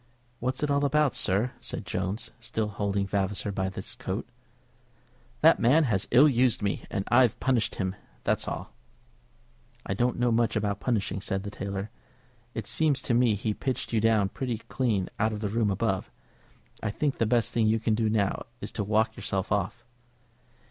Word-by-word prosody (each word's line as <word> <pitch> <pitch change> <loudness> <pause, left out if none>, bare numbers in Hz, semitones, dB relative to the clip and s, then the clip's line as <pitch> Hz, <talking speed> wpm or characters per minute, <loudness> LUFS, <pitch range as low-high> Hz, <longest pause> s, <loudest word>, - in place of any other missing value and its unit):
"What's 130 +4 -2
it 145 - +1
all 140 0 +2
about, 150 0 +3
sir?" 105 +7 +1
said - - -5
Jones, 95 +5 -3
still 110 -2 -2
holding 100 -1 -1
Vavasor 100 +1 -1
by 95 -1 -1
his 95 +4 -5
coat. 120 -5 -4 1.1
"That 165 +2 +6
man 140 +8 +5
has 110 -9 +1
ill 140 +5 +7
used 125 -5 +2
me, 100 - -1
and 100 - -2
I've 120 -2 +4
punished 125 -5 +1
him; 95 -1 -2 0.3
that's - - 0
all." - - -5 1.1
"I - - -1
don't 120 +5 +1
know 120 0 +2
much 115 0 +2
about 100 -2 0
punishing," 105 -5 -1
said 95 -2 -2
the 100 - -5
tailor. 100 +1 -4 0.6
"It 110 - -3
seems 150 +1 +1
to 120 - 0
me 120 -2 +4
he 105 +1 -1
pitched 130 +1 -3
you 110 - +3
down 110 -3 +3
pretty 125 -1 -3
clean 110 -8 0
out 110 +1 +2
of 105 - -4
the 105 -1 -2
room 110 0 +1
above. 100 -1 -1 0.7
I 110 - -1
think 140 +6 -1
the 115 - +2
best 120 0 +2
thing 115 -2 +3
you 110 +1 +3
can 110 0 +1
do 110 0 +1
now 105 -3 0
is - - -5
to 105 - -2
walk 110 +2 +1
yourself 95 -2 -3
off." 105 +4 -1
110 Hz, 185 wpm, -28 LUFS, 100-120 Hz, 1.1 s, ill